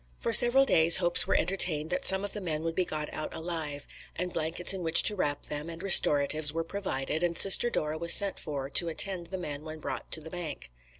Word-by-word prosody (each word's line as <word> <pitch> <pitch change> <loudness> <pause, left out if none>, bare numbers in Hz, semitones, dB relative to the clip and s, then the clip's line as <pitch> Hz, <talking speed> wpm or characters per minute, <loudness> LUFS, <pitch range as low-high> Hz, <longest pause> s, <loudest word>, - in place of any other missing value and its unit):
For 230 - -4
several 245 +4 +5
days 165 -8 +5
hopes 175 0 +5
were - - 0
entertained 165 -4 -1
that 275 - -1
some 190 +1 +1
of 205 - -7
the 210 - -3
men 160 -4 -5
would 165 0 -4
be 185 +2 -2
got 150 -2 -7
out 155 - -6
alive; 160 -3 -6 0.3
and 180 0 -5
blankets 165 +4 -2
in 190 - -7
which 165 -1 +5
to 210 - +2
wrap 145 -6 -3
them, 150 +2 -7
and 165 +2 -9
restoratives, 150 -5 +4
were 165 +1 -4
provided, 165 -5 -5
and 175 -1 -2
Sister 195 +5 +4
Dora 155 -6 -4
was 170 0 -1
sent 200 -1 +3
for 140 -4 -6
to 165 +4 0
attend 175 +1 -1
the 190 - -7
men 150 -5 -8
when 155 0 -10
brought 155 - -8
to 160 - 0
"bank." 160 - -9
165 Hz, 225 wpm, -27 LUFS, 155-185 Hz, 0.3 s, several